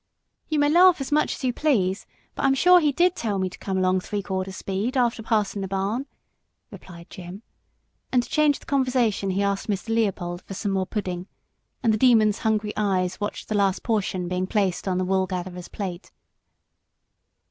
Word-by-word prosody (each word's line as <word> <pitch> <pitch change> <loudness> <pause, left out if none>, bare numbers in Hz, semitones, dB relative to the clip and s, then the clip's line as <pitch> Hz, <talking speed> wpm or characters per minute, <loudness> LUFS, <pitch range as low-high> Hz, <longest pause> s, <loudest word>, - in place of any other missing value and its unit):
"You 310 - 0
may 290 0 +3
laugh 355 +2 +6
as 270 0 -5
much 300 +1 +2
as - - -11
you 250 -1 +1
please, 210 -10 0 0.3
but - - -5
I'm 270 0 +4
sure 360 +6 +6
he 300 -3 +2
did 355 +5 +2
tell 210 - -2
me 185 -1 -1
to - - -11
come 190 -1 -3
along 185 0 +2
three 205 +2 -4
quarter 190 -1 -3
speed 200 +7 -3
after 240 -2 +1
passing 215 -3 0
the 195 - -3
barn," 200 +8 -2 0.6
replied 170 -2 -12
Jim, 185 +4 -9 0.7
and 250 -1 +3
to - - -10
change 300 -2 +2
the - - -19
conversation 255 -7 +1
he 190 +2 0
asked 200 -1 -1
Mr. 205 +1 -3
Leopold 185 -6 -1
for 195 - -9
some 200 +1 -2
more 190 -1 0
pudding, 185 -4 -4 0.6
and 225 -2 +3
the 215 - 0
Demon's 220 -4 +4
hungry 215 -1 0
eyes 190 -3 0
watched 205 - -4
the - - -3
last 200 -2 +1
portion 200 -5 -1
being 180 +1 -2
placed 195 -3 0
on 185 -1 0
the 185 - 0
Woolgatherer's 185 -1 -2
plate. 185 -3 -6
200 Hz, 190 wpm, -24 LUFS, 185-245 Hz, 0.7 s, laugh